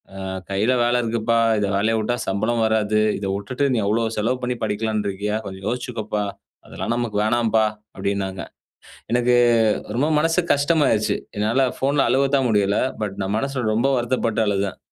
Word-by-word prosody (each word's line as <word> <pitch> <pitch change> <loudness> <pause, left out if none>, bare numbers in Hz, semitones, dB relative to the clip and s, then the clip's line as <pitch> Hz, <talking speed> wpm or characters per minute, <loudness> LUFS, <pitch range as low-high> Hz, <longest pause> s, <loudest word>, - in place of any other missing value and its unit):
ஆ, 95 - -7 0.3
கையில் 105 +6 +1
வேலை 120 +1 +2
இருக்குப்பா. 115 0 0 0.2
இதை 105 - 0
வேலைய 110 +3 +1
விட்டா 110 +3 0
சம்பளம் 110 +4 0
வராது. 110 -1 +1 0.2
இதை 100 - -4
விட்டுட்டு, 125 +7 -3
நீ - - +1
அவ்வளவு 110 +2 0
செலவு 115 +4 0
பண்ணி 125 0 -1
படிக்கலான்ட்டு 105 -1 -1
இருக்கியா? 105 +2 -3
கொஞ்சம் 95 0 -8
யோசிச்சுக்கப்பா. 110 -3 -3 0.4
அதெல்லாம் - - -4
நமக்கு 120 -4 -2
வேணாம்பா" 110 -1 +2 0.3
அப்படீன்னாங்க. 95 -1 -2 0.7
எனக்கு 120 0 +3 0.6
ரொம்ப 145 +5 +2
மனசு 165 +3 +2
கஷ்டமாகிருச்சு. 140 -8 +2 0.2
என்னால 110 +6 +2
ஃபோன்ல 140 0 +2
அழுவத்தான் 135 0 +2
முடியல. 100 -2 +2 0.2
பட் 100 -2 -2
நான் 100 +3 -1
மனசுல 135 0 -2
ரொம்ப 120 +5 +2
வருத்தப்பட்டு 115 -2 0
அழுதேன். 100 -1 -1
110 Hz, 150 wpm, -22 LUFS, 105-125 Hz, 0.7 s, எனக்கு